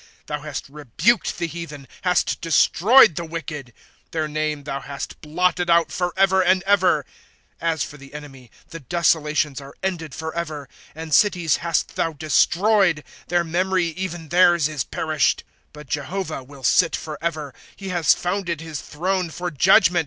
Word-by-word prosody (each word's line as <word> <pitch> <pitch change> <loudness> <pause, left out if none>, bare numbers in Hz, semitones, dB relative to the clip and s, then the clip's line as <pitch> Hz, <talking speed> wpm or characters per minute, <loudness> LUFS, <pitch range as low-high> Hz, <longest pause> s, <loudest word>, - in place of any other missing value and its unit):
^ - - -23 0.2
Thou 150 -1 -4
hast 150 -1 -6
rebuked 150 - 0
the 175 - -1
heathen, 155 -4 -8
hast 180 -1 +1
destroyed 170 - +5
the 170 - -3
wicked 155 -5 -6 0.4
• - - -44
Their 160 -1 -1
name 150 -1 -2
thou 140 -1 -4
hast 140 0 -7
blotted 175 +3 0
out 170 0 +4
forever 190 +1 +2
and 185 0 +3
ever. 195 -2 +3
^ - - -39 0.6
As 165 -2 0
for 150 - -8
the 135 +1 -14
enemy, 135 -4 -10 0.2
the 165 - -8
desolations 150 -1 0
are 140 0 -12
ended 170 -6 -3
forever; 160 -3 -5 0.3
And 160 -1 -6
cities 180 -5 +3
hast 170 -1 -1
thou 165 - 0
destroyed; 170 +3 +2 0.2
their 175 0 +2
memory, 180 +1 0
even 170 -2 -6
theirs, 175 -2 +4
is 150 -5 -3
perished, 155 +4 0
"' - - -40
But 150 0 -12
Jehovah 150 +2 -4
will 135 0 -14
sit 165 +5 +3
forever; 155 -2 -4 0.2
He 195 -1 -7
has 175 -3 +3
founded 175 -3 -2
his 160 -5 -6
throne 180 +6 -2
for 175 +2 -5
judgment. 170 +4 +5
165 Hz, 160 wpm, -22 LUFS, 150-180 Hz, 0.6 s, destroyed